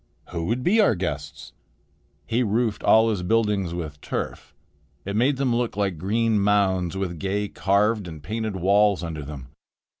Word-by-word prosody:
"Who 85 -2 -3
would 120 +3 -1
be 215 - +4
our 195 - +4
guests?" 75 -5 -5 0.7
He 115 +8 0
roofed 110 -1 0
all 110 +1 +5
his 100 -4 -2
buildings 105 -2 +1
with 75 -4 -6
turf. - - -5 0.5
It 100 +1 -3
made 130 +5 +2
them 130 -3 +1
look 120 -4 -1
like 95 -5 -1
green 110 +3 +1
mounds 95 -3 +1
with 90 -4 -3
gay 100 +3 -1
carved 100 +2 +1
and 80 -3 -9
painted 110 +2 -3
walls 100 +1 +3
under 80 -2 -5
them. 70 -2 -9
100 Hz, 160 wpm, -24 LUFS, 90-110 Hz, 0.7 s, all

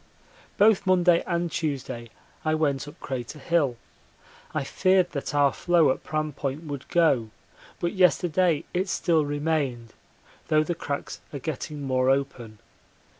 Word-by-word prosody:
Both 205 -1 +4
Monday 180 -2 +4
and 170 -1 -1
Tuesday 135 -7 -3 0.3
I 155 0 +1
went 145 -3 0
up 145 - -12
Crater 130 +2 -5
Hill. 145 -5 +1 0.7
I - - -1
feared 185 +4 +2
that 140 0 -4
our 140 -1 +4
floe 170 -5 +3
at - - -4
Pram 155 -1 -2
Point 140 +3 -4
would 145 -4 -6
go, 140 -10 +2 0.5
but 170 - -1
yesterday 180 -3 +3
it 185 +2 0
still 165 -4 +2
remained, 145 -6 -2 0.5
though 155 0 +3
the 175 - -2
cracks 145 -3 -5
are 145 - -5
getting 150 +1 -5
more 130 -1 +1
open. 135 -5 -1
150 Hz, 140 wpm, -26 LUFS, 135-170 Hz, 0.7 s, Both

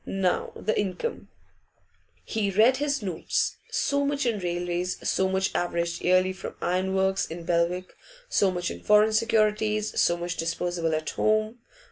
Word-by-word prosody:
Now 190 -2 0
the 215 - -1
income.' 205 - -3 1.0
He 215 -3 -1
read 220 +7 +4
his 285 -3 -1
notes: 180 -5 -1
So 280 0 0
much 280 -1 0
in 230 -4 0
railways, 175 0 -2
so 190 0 +1
much 190 0 0
averaged 170 -1 -1
yearly 185 +1 +3
from 190 - -8
iron 185 +2 0
works 190 0 +1
in 170 +1 -7
Belwick, 175 +2 0 0.3
so 200 - +2
much 175 -1 -2
in - - -8
foreign 210 +1 +4
securities, 215 -1 +1
so 175 - +3
much 175 +1 -4
disposable 170 -1 -1
at 155 0 -3
home. 215 +2 +1
190 Hz, 150 wpm, -26 LUFS, 175-215 Hz, 1.0 s, read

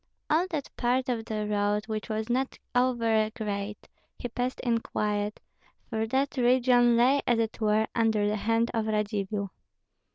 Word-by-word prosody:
All 330 +4 +3
that 305 -6 -4
part 255 +1 +1
of 230 -3 -1
the 215 -1 -2
road, 205 0 0
which 215 -1 -4
was 220 0 -2
not 260 +2 -1 0.2
over 230 -4 +2
great, 205 -2 -4 0.3
he 245 - -5
passed 250 +2 -2
in 235 -2 +1
quiet, 210 -1 -2 0.5
for 220 -1 -1
that 270 +4 0
region 245 -1 +4
lay 265 +4 +4
as 240 - +3
it 225 0 -2
were 215 0 +3
under 220 -3 +2
the 210 - 0
hand 225 +3 +1
of 225 -1 -1
Radzivill. 205 -2 -1
225 Hz, 160 wpm, -28 LUFS, 210-245 Hz, 0.5 s, region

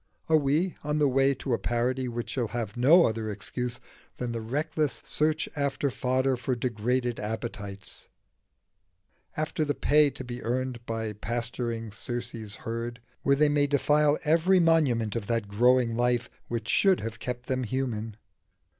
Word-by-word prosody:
Are 160 - +5
we 155 +5 +1
on 150 +1 0
the 150 -1 +4
way 135 +1 +3
to 130 0 -3
a - - +1
parody 125 +2 0
which 120 -1 -4
shall 125 -4 -1
have 110 -3 -4
no 155 +9 +6
other 110 -1 -1
excuse 120 +4 -4 0.4
than 125 -1 -3
the 115 -1 -3
reckless 145 +5 -1
search 155 +1 +1
after 140 -1 0
fodder 130 +1 +1
for 125 +1 -2
degraded 120 +1 -1
appetites 105 -2 -5 1.3
after 155 0 -1
the 145 -1 -1
pay 150 0 +4
to 135 - -8
be 120 -1 -6
earned 125 0 -2
by 110 -1 -2
pasturing 115 +1 -3
Circe's 115 -1 -5
herd 115 +1 -5 0.2
where 140 - +3
they 150 +2 +4
may 145 -1 +3
defile 150 +1 +3
every 170 +5 +4
monument 140 - +3
of 110 -4 -3
that 115 -3 0
growing 120 +3 +3
life 120 0 +1 0.2
which 120 -1 -3
should 195 -2 +4
have 115 0 -5
kept 125 -1 -4
them 130 -1 -1
human? 115 -3 -3
125 Hz, 155 wpm, -28 LUFS, 115-140 Hz, 1.3 s, no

